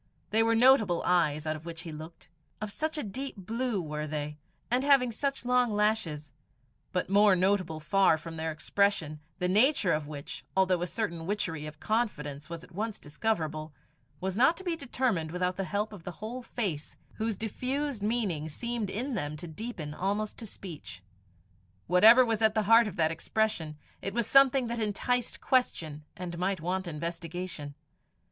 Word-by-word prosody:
They 220 - +4
were 230 0 +3
notable 225 -7 +5
eyes 155 -4 +2
out 155 0 -1
of 155 - -9
which 165 -1 -6
he 170 -2 -7
looked 155 +2 -10 0.3
of 215 -1 -4
such 315 +7 -2
a 300 - -2
deep 260 +7 -5
blue 230 +3 -2
were 150 -2 -4
they, 150 0 -4 0.3
and 250 +2 +3
having 275 -4 +5
such 275 +3 -2
long 250 -1 +3
lashes; 205 -10 0 0.6
but 180 - -1
more 200 +1 +5
notable 185 -3 +1
far 165 +2 +4
from 165 +1 -8
their 160 0 -2
expression, 155 -1 0 0.2
the 180 - 0
nature 210 - +4
of 150 -1 -1
which, 145 -2 -7
although 185 -2 +3
a 175 - -1
certain 170 -5 -3
witchery 165 -7 -2
of 150 0 -10
confidence 155 -11 -2
was 170 0 -6
at - - -15
once 210 +4 -3
discoverable, 155 -2 -2 0.5
was 190 0 -2
not 260 +9 +4
to 380 - -8
be 350 -3 -1
determined 245 - -1
without 180 +2 -1
the 195 - -2
help 210 +2 -2
of 190 -5 -10
the 180 - -6
whole 230 +7 -6
face, 190 -11 -4 0.2
whose 220 -2 -1
diffused 255 +3 -2
meaning 200 -8 -1
seemed 235 +5 -3
in 255 +7 -3
them 150 -7 -3
to 170 - -7
deepen 160 -3 -6
almost 205 +5 -1
to 225 - -7
speech. 150 - -9 0.8
Whatever 220 +8 +8
was 225 -2 0
at 220 -1 +4
the 215 - +2
heart 230 +2 +6
of 200 - -6
that 160 -1 +2
expression, 165 -3 -1 0.2
it 195 +2 -4
was 235 -2 +1
something 270 +1 +6
that 235 0 -3
enticed 230 +3 -1
question 155 - 0
and 175 -1 -5
might 190 +1 0
want 185 +3 -2
investigation. 170 -1 -5
190 Hz, 175 wpm, -30 LUFS, 160-225 Hz, 0.8 s, Whatever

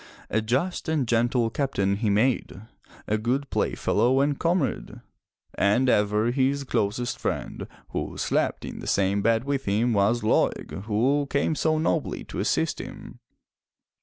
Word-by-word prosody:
A 110 - +2
just 135 +11 -1
and 150 -6 0
gentle 120 0 +1
Captain 100 -9 0
he 110 0 0
made, 110 0 +1 0.5
a 105 +1 0
good 130 +6 -1
playfellow 120 +6 +1
and 140 0 +1
comrade. 165 - -1 0.5
And 105 +6 +2
ever 105 +1 +2
his 135 +2 +1
closest 120 0 -1
friend, - - -3 0.2
who - - -4
slept - - 0
in - - -7
the - - -8
same 100 +1 +1
bed 115 +2 +2
with 135 0 -2
him, 110 +4 +1
was 105 +3 +2
Laeg, 105 -2 0
who 130 +7 +1
came 140 +2 +1
so 155 +1 +1
nobly 155 - -1
to - - -7
assist - - 0
him. - - -10
120 Hz, 145 wpm, -25 LUFS, 105-140 Hz, 0.5 s, A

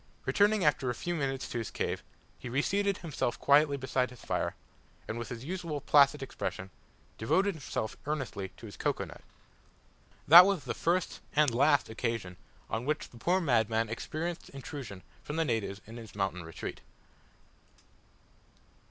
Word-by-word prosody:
Returning 205 -2 +3
after 145 -3 +2
a 120 - -1
few 175 - -3
minutes 135 -4 -2
to 120 - -3
his 115 - -4
cave, - - -2 0.4
he 125 - -6
reseated 195 +10 +1
himself 150 -7 -2
quietly 145 0 +5
beside 130 -1 0
his 125 -2 -14
fire, - - -1 0.5
and, 115 - -3
with 115 - -5
his 120 -1 -6
usual 170 -3 -3
placid 140 0 +5
expression, 95 -6 -5 0.5
devoted 190 - +2
himself 135 -8 -4
earnestly 135 -10 -3
to - - -11
his 105 - -10
cocoa - - -1
nut. - - -12 1.1
That 175 +5 +11
was 195 -7 0
the 125 - -3
first 175 +2 0 0.2
and 150 -4 +4
last 140 +3 +4
occasion 110 -5 -3 0.3
on 115 +4 -3
which 150 +2 -1
the 120 - -13
poor 175 +10 +2
madman 115 - +2
experienced 160 +9 -4
intrusion 135 -8 -8 0.2
from 150 - -6
the 165 0 +1
natives 110 -6 -2
in 115 +2 -10
his 110 -4 -10
mountain 95 -3 -1
retreat. 80 0 -7
135 Hz, 155 wpm, -31 LUFS, 115-155 Hz, 1.1 s, That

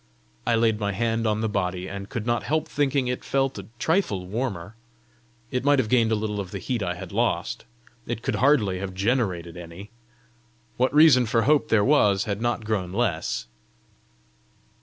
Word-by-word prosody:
I 120 - +3
laid 115 -1 +2
my 100 -1 -1
hand 115 +2 0
on 105 0 0
the 110 - 0
body, 90 -3 -2
and 100 0 -7
could 120 -4 -4
not 120 0 +1
help 155 +1 -1
thinking 140 -2 0
it 125 0 -3
felt 135 -4 0
a 95 - -9
trifle 120 - 0
warmer. 105 -2 -4 0.8
It 125 - -1
might 145 +1 +4
have 115 -5 0
gained 115 -2 +3
a - - +3
little 105 -1 -3
of 95 -2 -4
the - - -5
heat 125 -4 -3
I 90 -2 -2
had 90 -1 -9
lost! - - -1 0.4
it 120 0 -4
could - - -1
hardly 115 -9 +3
have 95 -1 -5
generated 95 -6 -1
any! 90 +4 -10 0.8
What 130 +1 +1
reason 145 -5 +6
for 115 +1 +2
hope 150 +1 +3
there 105 -2 +3
was 105 -9 +4
had 100 0 -3
not 120 -2 -1
grown 100 -5 -1
less! 95 -6 -1
110 Hz, 180 wpm, -25 LUFS, 100-125 Hz, 0.8 s, reason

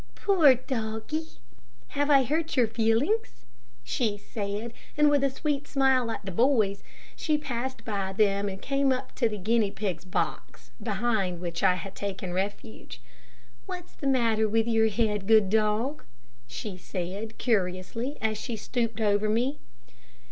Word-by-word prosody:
"Poor 325 -10 +5
doggie, 240 +5 -3 0.6
have 290 +1 0
I 275 -2 +6
hurt 310 +4 -1
your 245 - +6
feelings?" 225 - 0 0.4
she 205 - -1
said, 205 +2 -4 0.2
and 300 0 +5
with 285 -1 +3
a 275 - +4
sweet 285 +1 -2
smile 265 -3 +3
at 225 - -5
the 190 - -4
boys, 215 -2 +2 0.3
she 305 -2 +1
passed 260 -3 -4
by 200 -3 -2
them 200 0 +2
and 190 0 -6
came 275 +2 +1
up 260 0 -2
to 235 -3 +1
the 210 - -4
guinea 215 +2 +2
pig's 195 -4 -3
box, 185 - -4
behind 210 -4 0
which 170 -1 -4
I 185 -2 +4
had 190 +2 -7
taken 190 -3 -4
refuge. 200 - -4 0.7
"What 360 -2 -5
is - - -26
the 280 - -4
matter 225 -5 +2
with 225 +1 +2
your 225 -1 +3
head, 210 -2 0
good 215 -3 +5
dog?" 220 +6 +1 0.4
she 195 - -6
said, 190 +4 -5
curiously, 215 +4 -1
as 215 -1 0
she 235 - -4
stooped 230 +1 -2
over 210 0 +2
me. 245 +7 0
220 Hz, 155 wpm, -28 LUFS, 200-260 Hz, 0.7 s, I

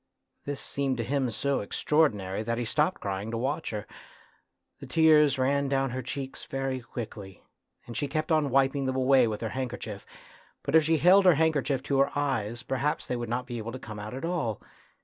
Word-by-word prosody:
This 140 -1 -4
seemed 135 -2 -2
to 115 - -1
him 135 +1 0
so 140 +4 -1
extra 105 +8 -3
ordinary 105 -10 +2
that 115 +1 -2
he 120 - -2
stopped 150 +10 0
crying 100 +2 -3
to 115 - -3
watch 140 +7 -2
her; 105 -2 -4 0.9
the - - -9
tears 150 -4 +5
ran 140 +2 +1
down 135 -1 +1
her 130 +1 -3
cheeks 135 +2 -6
very 135 -1 -2
quickly, 105 -6 -8 0.4
and 120 - -9
she 145 - -1
kept 155 +3 -2
on 155 -3 +3
wiping 135 +1 +2
them 130 - -1
away 130 -1 +4
with 105 -1 -3
her 115 - -2
handkerchief, 125 -5 -5 0.6
but - - -3
if 160 -1 +7
she 160 +1 +2
held 185 +5 +6
her 180 -3 +7
handkerchief 145 -4 +1
to 140 -1 0
her 140 +1 +4
eyes 120 -5 -1
perhaps 135 +4 -1
they 125 - -2
would 120 -2 -4
not 125 +2 -1
be 120 -2 -5
able 115 +2 -5
to - - -4
come 110 -4 -8
out 105 +4 -6
at 135 - -4
all. 155 - -1
130 Hz, 210 wpm, -28 LUFS, 115-145 Hz, 0.9 s, if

